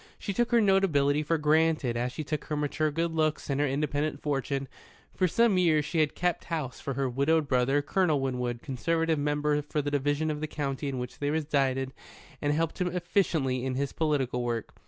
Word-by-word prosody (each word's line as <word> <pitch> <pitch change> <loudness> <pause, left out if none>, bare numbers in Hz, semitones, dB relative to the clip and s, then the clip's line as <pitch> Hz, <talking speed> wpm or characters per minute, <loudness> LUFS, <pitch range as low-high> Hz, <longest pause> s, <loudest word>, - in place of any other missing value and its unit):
She 200 - -4
took 240 +4 +1
her 235 -1 +4
notability 160 -8 +3
for 160 +2 0
granted, 155 -4 +2
as 120 +1 -1
she 155 - -5
took 150 0 -3
her 155 - -3
mature 150 +1 0
good 165 +2 -1
looks 155 -2 0
and 140 +1 +1
her 145 - +2
independent 145 +1 -1
fortune. 140 -1 -2 0.5
For 185 - +2
some 210 +1 +3
years 155 -4 +3
she 165 - -1
had 155 -2 +2
kept 180 -1 -1
house 155 -7 -4
for 140 - -4
her 135 0 0
widowed 140 +5 +1
brother, 135 +2 +2
Colonel 160 -1 +2
Winwood, 125 -3 -2
Conservative 160 +4 0
Member 150 0 +1
for 150 +1 -3
the 145 0 -1
Division 145 +2 0
of 150 0 -4
the 155 - -2
county 145 -1 -3
in 135 - -3
which 125 0 -6
they 145 - 0
resided, 135 -4 0 0.5
and 145 - +1
helped 160 +4 -1
him 180 - +2
efficiently 170 -7 0
in 130 -1 -2
his 140 +1 -2
political 135 -6 0
work. 120 -2 -3
150 Hz, 200 wpm, -28 LUFS, 135-160 Hz, 0.5 s, her